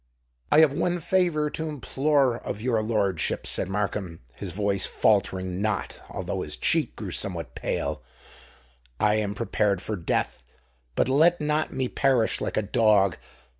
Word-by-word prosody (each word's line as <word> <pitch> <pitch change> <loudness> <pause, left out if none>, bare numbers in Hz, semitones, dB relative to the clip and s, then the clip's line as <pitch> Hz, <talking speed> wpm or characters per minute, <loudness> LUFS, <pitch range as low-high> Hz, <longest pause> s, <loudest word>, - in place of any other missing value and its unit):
"I 155 - +7
have 155 -3 +5
one 175 +4 0
favour 165 -3 +1
to 160 0 -4
implore 140 -2 +1
of - - -5
your 115 -1 +1
lordship," 105 -6 0
said - - -1
Markham, 95 -4 -3
his - - -6
voice 100 -1 0
faltering 95 -3 +1
not, 110 -1 -2
although - - -4
his 75 0 -6
cheek 160 -7 +1
grew 100 -4 -6
somewhat 85 -3 -3
pale: - - -3 1.0
"I 105 0 +3
am 105 -1 -2
prepared 105 -4 0
for 110 - -4
death—but 60 - -3
let 160 +6 +4
me 150 - -3
not 150 +1 0 0.2
perish 130 -5 +2
like - - -2
a 110 - +2
dog. 105 -4 +3
110 Hz, 145 wpm, -26 LUFS, 95-145 Hz, 1.0 s, I